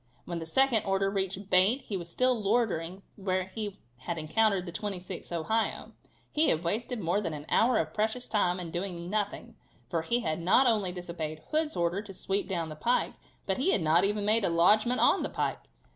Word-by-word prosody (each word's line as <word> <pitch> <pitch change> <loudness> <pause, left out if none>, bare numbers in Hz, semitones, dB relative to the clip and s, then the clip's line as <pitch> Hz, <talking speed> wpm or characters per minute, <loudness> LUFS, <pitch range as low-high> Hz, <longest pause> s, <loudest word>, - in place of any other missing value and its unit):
When 170 -1 -4
the 165 - -7
second 265 +3 +3
order 195 0 +1
reached 195 0 -3
Bate 195 +9 +4
he 205 - -4
was 170 -2 -5
still 255 +8 +2
loitering 195 -4 0
where 185 -2 -1
he 205 +1 -6 0.2
had 165 +6 -4
encountered 195 +4 +1
the 175 - -6
26th 185 -1 -6
Ohio. 220 +7 -1 0.4
He 310 +1 +3
had 160 +1 +1
wasted 225 +7 -2
more 180 +2 0
than 165 -6 -3
an 145 0 -8
hour 235 +1 +3
of 155 -4 -1
precious 220 +4 -1
time 185 -4 +1
in 170 -2 -6
doing 175 0 -4
nothing, 215 +2 -3 0.3
for 165 - 0
he 235 +9 0
had 160 -9 -2
not 190 +10 +4
only 210 -6 +2
disobeyed 170 -3 -6
Hood's 310 0 0
order 175 +3 0
to 200 -2 -10
sweep 195 +1 -2
down 170 -4 -2
the 155 - -7
pike, 235 +11 0 0.3
but 190 +3 -1
he 315 +9 +3
had - - +3
not 160 +3 +4
even 205 +1 +1
made 215 +1 +3
a - - +2
lodgement 215 +9 +4
on - - +4
the - - -2
pike. - - -2
195 Hz, 205 wpm, -29 LUFS, 170-220 Hz, 0.4 s, Bate